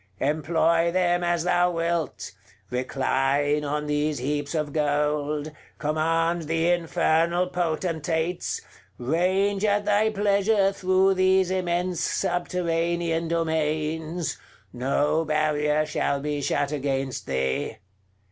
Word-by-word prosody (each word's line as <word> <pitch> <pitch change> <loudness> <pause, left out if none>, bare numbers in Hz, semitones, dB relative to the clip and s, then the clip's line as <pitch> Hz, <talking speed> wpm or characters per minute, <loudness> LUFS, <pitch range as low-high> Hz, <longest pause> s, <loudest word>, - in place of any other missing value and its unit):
Employ 165 +3 +2
them 175 -1 +1
as 175 -1 +1
thou 180 0 +3
wilt: 165 - -2 0.4
recline 135 +3 0
on 150 +1 -2
these 150 0 0
heaps 145 +4 -2
of 150 -2 -2
gold; 150 0 0 0.3
command 165 +2 0
the 165 +2 +1
Infernal 170 0 +2
Potentates; 165 -1 -2 0.4
range 185 - +1
at 205 -1 +2
thy 210 +1 +3
pleasure 200 -1 +2
through 190 0 +3
these 185 0 +3
immense 180 -1 -1
subterranean 170 -2 -1
domains; 160 0 -1 0.3
no 140 +5 +1
barrier 155 -1 +1
shall 140 -2 -1
be 145 0 -3
shut 145 +1 0
against 135 -2 -2
thee. 65 0 -1
160 Hz, 100 wpm, -25 LUFS, 150-175 Hz, 0.4 s, thou